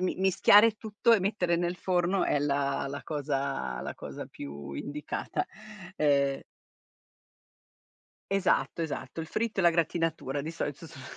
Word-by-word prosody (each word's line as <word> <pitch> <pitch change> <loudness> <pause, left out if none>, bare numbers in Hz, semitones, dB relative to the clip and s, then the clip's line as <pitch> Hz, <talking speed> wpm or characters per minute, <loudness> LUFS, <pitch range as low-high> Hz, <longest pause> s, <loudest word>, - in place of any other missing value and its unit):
mi 185 - 0
mischiare 190 +3 +6
il 220 -1 0
tutto 220 +2 +1
e - - +4
mettere 185 -3 +1
nel 175 +1 0
forno 180 +1 +1
è - - +2
la 140 -1 0
la 140 +1 -6
cosa 140 - -2
la - - -5
cosa - - -7
più 70 0 -8
indicata, 145 - -4 0.5
ehm 140 -2 +2 1.9
Esatto, 195 -3 +1
esatto 160 -2 -4
il 160 - -5
fritto 215 +3 -1
e - - +1
la 175 - +7
gratinatura 165 -4 0
di 155 +3 -4
solito 165 0 -4
son 145 -4 -12
165 Hz, 145 wpm, -29 LUFS, 140-185 Hz, 1.9 s, la